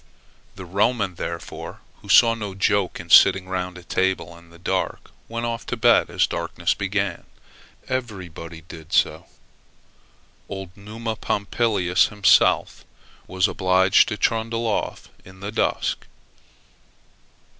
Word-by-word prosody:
The 95 Hz, -, -9 dB
Roman, 100 Hz, +2 st, 0 dB
therefore, -, -, -7 dB, 0.2 s
who -, -, -14 dB
saw 115 Hz, -1 st, +7 dB
no 105 Hz, -4 st, -6 dB
joke 100 Hz, -1 st, 0 dB
in 85 Hz, -1 st, -9 dB
sitting 95 Hz, -1 st, +7 dB
round 90 Hz, -1 st, -4 dB
a 90 Hz, -, -12 dB
table 95 Hz, 0 st, -1 dB
in 85 Hz, 0 st, -17 dB
the 85 Hz, -, -16 dB
dark, 95 Hz, +1 st, -3 dB, 0.2 s
went 115 Hz, +1 st, -3 dB
off 115 Hz, -1 st, -3 dB
to -, -, -3 dB
bed -, -, +4 dB
as -, -, +1 dB
the -, -, -5 dB
darkness -, -, -1 dB
began. 100 Hz, -2 st, -2 dB, 0.6 s
Everybody 90 Hz, -9 st, -5 dB
did 80 Hz, 0 st, -12 dB
so. -, -, +1 dB, 1.2 s
Old 95 Hz, -2 st, -7 dB
Numa 110 Hz, +2 st, -6 dB
Pompilius 100 Hz, -4 st, +1 dB
himself, 105 Hz, -2 st, +3 dB, 0.4 s
was 95 Hz, -1 st, +1 dB
obliged 95 Hz, +1 st, +3 dB
to 105 Hz, -, -3 dB
trundle 115 Hz, +1 st, 0 dB
off 110 Hz, -, -3 dB
in 95 Hz, 0 st, -15 dB
the 100 Hz, +2 st, -5 dB
dusk. -, -, -1 dB
95 Hz, 130 wpm, -23 LUFS, 90-110 Hz, 1.2 s, saw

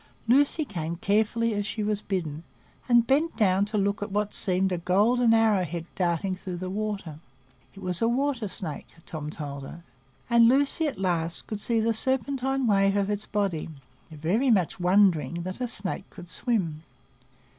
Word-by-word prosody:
Lucy 285 Hz, +5 st, +3 dB
came 170 Hz, -, -4 dB
carefully 220 Hz, +5 st, +1 dB
as 205 Hz, 0 st, -1 dB
she 210 Hz, +1 st, -3 dB
was 210 Hz, 0 st, -1 dB
bidden, 165 Hz, -7 st, -3 dB, 0.5 s
and 240 Hz, -1 st, +5 dB
bent 295 Hz, +6 st, +1 dB
down 195 Hz, -2 st, +3 dB
to 210 Hz, +1 st, -3 dB
look 200 Hz, +1 st, 0 dB
at 205 Hz, 0 st, -4 dB
what 210 Hz, +1 st, -1 dB
seemed 190 Hz, 0 st, +1 dB
a 180 Hz, -, -1 dB
golden 225 Hz, +7 st, +3 dB
arrow 220 Hz, -4 st, +4 dB
head 170 Hz, -1 st, -5 dB
darting 180 Hz, +1 st, 0 dB
through 185 Hz, -1 st, -6 dB
the 185 Hz, +1 st, -5 dB
water. 200 Hz, -7 st, -4 dB, 0.6 s
It 195 Hz, -, -11 dB
was 180 Hz, +1 st, -2 dB
a 230 Hz, -, +3 dB
water 250 Hz, -2 st, 0 dB
snake, 175 Hz, -5 st, -6 dB, 0.2 s
Tom 155 Hz, -4 st, -6 dB
told 145 Hz, -3 st, -6 dB
her; 165 Hz, +5 st, -10 dB, 0.4 s
and 235 Hz, -1 st, +6 dB
Lucy 285 Hz, +5 st, +2 dB
at 275 Hz, -, -4 dB
last 170 Hz, -3 st, -1 dB
could 215 Hz, -, -5 dB
see 230 Hz, +1 st, +1 dB
the 225 Hz, +1 st, +1 dB
serpentine 265 Hz, +2 st, 0 dB
wave 195 Hz, -2 st, +3 dB
of 200 Hz, 0 st, 0 dB
its 205 Hz, +1 st, -3 dB
body, 195 Hz, -7 st, -1 dB, 0.4 s
very 170 Hz, -, 0 dB
much 190 Hz, -6 st, +2 dB
wondering 175 Hz, -4 st, +3 dB
that 185 Hz, +7 st, -6 dB
a 250 Hz, -, 0 dB
snake 195 Hz, -3 st, -2 dB
could 175 Hz, -, -12 dB
swim. 180 Hz, -10 st, -1 dB
200 Hz, 175 wpm, -26 LUFS, 180-230 Hz, 0.6 s, and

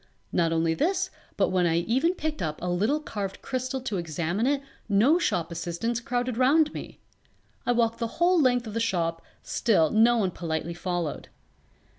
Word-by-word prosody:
Not 170 Hz, -2 st, +2 dB
only 165 Hz, 0 st, +2 dB
this 370 Hz, -, 0 dB, 0.3 s
but -, -, +3 dB
when 180 Hz, -1 st, +2 dB
I 165 Hz, 0 st, +2 dB
even 260 Hz, -, +1 dB
picked 310 Hz, -, -3 dB
up 155 Hz, -3 st, -3 dB
a -, -, -5 dB
little 210 Hz, +12 st, +1 dB
carved 205 Hz, -9 st, -5 dB
crystal 255 Hz, 0 st, -2 dB
to 230 Hz, -6 st, -3 dB
examine 170 Hz, -, -1 dB
it 280 Hz, 0 st, +1 dB, 0.3 s
no 235 Hz, -, +4 dB
shop 175 Hz, -, 0 dB
assistants 170 Hz, +8 st, -2 dB
crowded 245 Hz, 0 st, -2 dB
round 295 Hz, +4 st, +4 dB
me. -, -, -8 dB, 0.7 s
I -, -, +4 dB
walked 230 Hz, -1 st, +1 dB
the 230 Hz, -, 0 dB
whole 345 Hz, 0 st, +4 dB
length 245 Hz, -3 st, +3 dB
of 215 Hz, -, -7 dB
the 230 Hz, -, -1 dB
shop, 170 Hz, -7 st, 0 dB, 0.2 s
still 180 Hz, -9 st, +2 dB
no 230 Hz, +2 st, +5 dB
one 195 Hz, -5 st, +1 dB
politely 165 Hz, 0 st, -3 dB
followed. 175 Hz, -3 st, -3 dB
225 Hz, 175 wpm, -27 LUFS, 170-255 Hz, 0.7 s, no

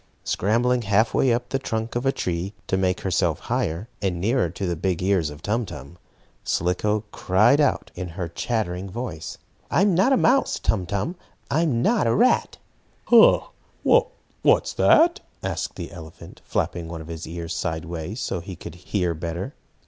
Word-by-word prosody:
Scrambling 120 Hz, +5 st, +1 dB
half 105 Hz, +1 st, +2 dB
way 130 Hz, -, +3 dB
up 120 Hz, +1 st, -1 dB
the 135 Hz, -, 0 dB
trunk 110 Hz, -3 st, -3 dB
of 120 Hz, +3 st, 0 dB
a -, -, +5 dB
tree, 90 Hz, -2 st, -3 dB
to -, -, 0 dB
make 95 Hz, +2 st, 0 dB
herself 95 Hz, -3 st, +1 dB
higher, 85 Hz, +7 st, -2 dB
and 95 Hz, -4 st, -1 dB
nearer 115 Hz, 0 st, +1 dB
to 95 Hz, +4 st, -5 dB
the 90 Hz, -1 st, -1 dB
big 90 Hz, +1 st, -1 dB
ears 95 Hz, -5 st, +2 dB
of 75 Hz, +2 st, -11 dB
Tum 115 Hz, +4 st, 0 dB
Tum, 85 Hz, -3 st, -10 dB, 0.4 s
Slicko 100 Hz, +5 st, 0 dB
cried 110 Hz, +10 st, +3 dB
out 145 Hz, -, +1 dB
in 90 Hz, 0 st, -5 dB
her 85 Hz, +1 st, -5 dB
chattering 95 Hz, 0 st, -2 dB
voice: 100 Hz, -3 st, -6 dB, 0.3 s
"I'm 195 Hz, +2 st, +3 dB
not 190 Hz, +10 st, +3 dB
a 265 Hz, -, +5 dB
mouse, 265 Hz, +3 st, +3 dB
Tum 95 Hz, -5 st, -1 dB
Tum! 100 Hz, -, -2 dB, 0.3 s
I'm 140 Hz, -6 st, +2 dB
not 220 Hz, -, +3 dB
a 115 Hz, -, +2 dB
rat!" 245 Hz, +4 st, +3 dB, 0.5 s
"Ha! 235 Hz, -2 st, +6 dB, 0.9 s
What's -, -, +3 dB
that?" 340 Hz, +4 st, +5 dB, 0.2 s
asked -, -, -3 dB
the 85 Hz, -3 st, -7 dB
elephant, 80 Hz, -2 st, -11 dB
flapping 85 Hz, -1 st, -2 dB
one 80 Hz, -1 st, -6 dB
of 80 Hz, -, -10 dB
his 85 Hz, 0 st, -6 dB
ears 85 Hz, 0 st, -5 dB
sideways, 85 Hz, +4 st, -4 dB
so 95 Hz, -5 st, -2 dB
he 90 Hz, +2 st, -8 dB
could 85 Hz, -1 st, -9 dB
hear 90 Hz, 0 st, -1 dB
better. 85 Hz, -, -5 dB
95 Hz, 170 wpm, -24 LUFS, 85-120 Hz, 0.9 s, Ha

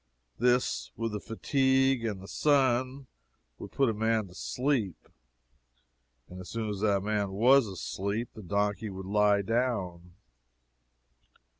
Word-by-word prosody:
This, 125 Hz, +1 st, +1 dB
with 115 Hz, -1 st, -2 dB
the 105 Hz, -, -3 dB
fatigue, 135 Hz, +2 st, +1 dB
and 105 Hz, -4 st, -3 dB
the -, -, -10 dB
sun, 130 Hz, -1 st, +1 dB, 0.5 s
would -, -, -9 dB
put 135 Hz, -, +2 dB
a 115 Hz, -, +1 dB
man 110 Hz, -2 st, 0 dB
asleep; 120 Hz, -, -2 dB, 1.2 s
and 90 Hz, 0 st, -10 dB
soon 110 Hz, -2 st, -3 dB
as 100 Hz, -, -5 dB
the 100 Hz, -1 st, +2 dB
man 100 Hz, 0 st, -1 dB
was 120 Hz, +6 st, +4 dB
asleep, 100 Hz, +4 st, -4 dB
the 110 Hz, -, -10 dB
donkey 100 Hz, +2 st, -1 dB
would 95 Hz, -1 st, -7 dB
lie 105 Hz, 0 st, +3 dB
down. 95 Hz, -7 st, -2 dB
110 Hz, 125 wpm, -29 LUFS, 100-125 Hz, 1.2 s, was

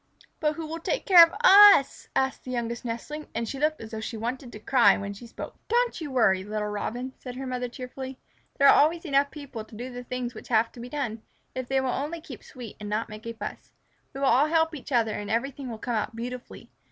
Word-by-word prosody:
"But 300 Hz, -1 st, +1 dB
who 330 Hz, -, -5 dB
will 325 Hz, +2 st, -5 dB
take -, -, -2 dB
care 355 Hz, -3 st, +10 dB
of 330 Hz, -, +3 dB
us?" 410 Hz, -, +7 dB
asked 265 Hz, 0 st, 0 dB
the -, -, -7 dB
Youngest 235 Hz, -1 st, -3 dB
Nestling, 250 Hz, +6 st, -5 dB
and 230 Hz, 0 st, -2 dB
she 270 Hz, -, -5 dB
looked 310 Hz, +1 st, +1 dB
as 225 Hz, 0 st, -9 dB
though 220 Hz, -, -5 dB
she 220 Hz, +1 st, -5 dB
wanted 240 Hz, +3 st, -4 dB
to 210 Hz, -, -9 dB
cry 245 Hz, +2 st, +4 dB
when 200 Hz, 0 st, -5 dB
she 235 Hz, +4 st, -11 dB
spoke. -, -, -9 dB
"Don't 475 Hz, -3 st, +1 dB
you 305 Hz, -, -4 dB
worry, 205 Hz, -8 st, +3 dB
little 210 Hz, +1 st, -3 dB
Robin," 245 Hz, +5 st, -4 dB
said 250 Hz, -1 st, -8 dB
her 265 Hz, +1 st, -5 dB
mother 250 Hz, -1 st, -3 dB
cheerfully. 260 Hz, +1 st, -7 dB, 0.4 s
"There 280 Hz, -, +6 dB
are -, -, +9 dB
always 330 Hz, +4 st, +3 dB
enough 280 Hz, -2 st, +2 dB
people 280 Hz, -7 st, -8 dB
to 220 Hz, -, -14 dB
do 245 Hz, +4 st, -6 dB
the 245 Hz, 0 st, -7 dB
things 250 Hz, -1 st, -4 dB
which -, -, -11 dB
have 225 Hz, -1 st, +2 dB
to -, -, -13 dB
be 240 Hz, +1 st, -7 dB
done, 245 Hz, -6 st, -3 dB, 0.3 s
if 255 Hz, -1 st, -4 dB
they 270 Hz, +1 st, +1 dB
will 265 Hz, -1 st, -1 dB
only 300 Hz, +6 st, -3 dB
keep 280 Hz, -8 st, -11 dB
sweet 245 Hz, -5 st, -10 dB
and 210 Hz, -1 st, -6 dB
not 215 Hz, +2 st, -2 dB
make 215 Hz, +2 st, -9 dB
a 230 Hz, -, -4 dB
fuss. 225 Hz, -, -8 dB, 0.4 s
We 275 Hz, -, -5 dB
will 275 Hz, -, +3 dB
all 270 Hz, +4 st, +4 dB
help 320 Hz, 0 st, +2 dB
each 290 Hz, -1 st, -9 dB
other 230 Hz, -3 st, +2 dB
and 205 Hz, 0 st, -5 dB
everything 260 Hz, +3 st, -2 dB
will 225 Hz, -, -6 dB
come 240 Hz, +2 st, -4 dB
out 225 Hz, +1 st, -2 dB
beautifully. 245 Hz, +2 st, -7 dB
250 Hz, 245 wpm, -27 LUFS, 230-285 Hz, 0.4 s, care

